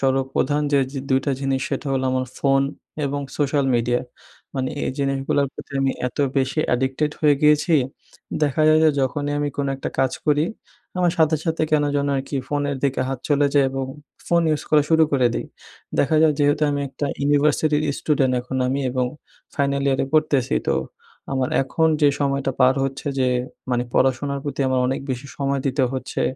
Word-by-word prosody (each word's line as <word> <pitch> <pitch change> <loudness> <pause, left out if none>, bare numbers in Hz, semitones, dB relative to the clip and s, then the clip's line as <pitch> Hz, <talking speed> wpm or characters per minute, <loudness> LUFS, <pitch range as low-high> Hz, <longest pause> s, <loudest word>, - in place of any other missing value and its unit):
সর্বপ্রধান 135 +2 +1
যে 140 - +5
যে 140 - -4
২ 130 0 +3
টা 145 - 0
জিনিস 135 -1 0
সেটা 140 +1 -3
হলো 130 -1 0
আমার 130 0 0
ফোন 135 -1 +3 0.4
এবং 140 0 -2 0.2
সোশ্যাল 145 -1 +1
মিডিয়া। 120 +1 +1 0.5
মানে 130 -1 -1 0.2
এই - - -1
জিনিসগুলার 135 0 0
প্রতি - - -11
আমি 135 -1 +2 0.2
এত 125 - -16 0.2
বেশি 135 +3 +1
অ্যাডিক্টেড 130 +4 0
হয়ে 150 -2 +5
গিয়েছি, 150 +3 +4 0.7
দেখা 145 +1 +2
যায় 155 0 +6
যে 155 - +6
যখনই 145 +2 -1
আমি 145 0 0
কোনো 140 -1 -1
একটা 135 - -4
কাজ 135 -1 +2
করি, 150 0 +3 0.5
আমার 175 -2 +2
সাথে, 160 0 +4
সাথে 165 -2 -1
কেন 150 -1 +3
যেন 140 0 0
আরকি 135 +1 -3
ফোনের 145 -1 -1
দিকে 135 -2 0
হাত 135 -1 -3
চলে 145 -1 +3
যায় 140 -1 +5
এবং 135 0 -3 0.4
ফোন 170 -1 +3
ইউজ 155 - 0
করা 150 -1 +5
শুরু 160 0 +5
করে 130 -3 +3
দেই। - - -3 0.5
দেখা 155 +3 +3
যায় 155 -1 +5
যেহেতু 145 +1 +2
আমি 145 0 -1
একটা 140 +2 -4
ইউনিভার্সিটির 145 +1 +2 0.2
স্টুডেন্ট 135 -4 +1
এখন 125 +2 -5
আমি 135 +2 0
এবং 125 0 0 0.5
ফাইনাল 140 0 0
ইয়ারে 135 -1 +2
পড়তেছি 145 -4 +2
তো - - +2 0.6
আমার 130 -1 0
এখন 160 +4 +1
যে 145 - +6
সময়টা 140 -1 0
পার 130 +1 +6
হচ্ছে 135 +2 -5
যে 130 -1 +2 0.4
মানে 120 -1 +1
পড়াশোনার 140 +2 +1
প্রতি 145 -1 -4
আমার 130 -1 +1
অনেক 130 +1 -1
বেশি 130 +2 -4
সময় 140 -1 -1
দিতে 135 +1 +1
হচ্ছে, 130 -1 -3
140 Hz, 180 wpm, -22 LUFS, 130-145 Hz, 0.7 s, যায়